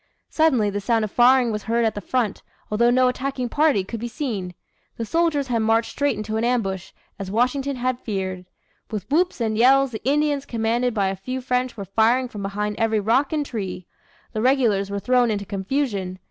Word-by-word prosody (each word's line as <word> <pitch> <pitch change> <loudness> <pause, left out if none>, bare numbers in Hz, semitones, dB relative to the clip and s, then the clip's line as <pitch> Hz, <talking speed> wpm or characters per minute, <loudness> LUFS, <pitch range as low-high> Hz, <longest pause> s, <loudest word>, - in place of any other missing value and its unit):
Suddenly 260 -10 +3
the 205 +1 -3
sound 225 +1 +1
of 210 - -8
firing 250 0 +5
was 210 -1 -3
heard 230 +1 +1
at 220 - +1
the 205 - -5
front, 230 -1 -1 0.3
although 235 +3 +3
no 255 +1 +4
attacking 255 0 -2
party 290 -8 +2
could 225 +4 -6
be 240 - -4
seen. 215 - -4 0.4
The 230 - -3
soldiers 325 0 +1
had 235 -2 +1
marched 225 +1 +2
straight 285 -5 0
into 215 +1 -3
an 225 - -1
ambush, 195 -7 -1 0.3
as 195 -1 -5
Washington 255 +6 0
had 250 0 -1
feared. 190 -5 -4 0.4
With 210 -4 -5
whoops 350 +2 +2
and 220 -2 0
yells 265 +3 +4
the 220 - -7
Indians 285 +1 +1
commanded 235 +1 0
by 195 -2 +1
a 195 - -3
few 255 +8 -5
French 250 -1 -1
were 200 - -5
firing 230 +6 +2
from 210 - -7
behind 210 +1 -3
every 225 -1 +2
rock 235 +7 +2
and 300 -2 -1
tree. 195 -7 -5 0.5
The 215 - -2
regulars 230 -6 +2
were 200 - -3
thrown 250 +2 +2
into 205 -2 -2
confusion. 195 -2 -2
230 Hz, 200 wpm, -23 LUFS, 205-255 Hz, 0.5 s, firing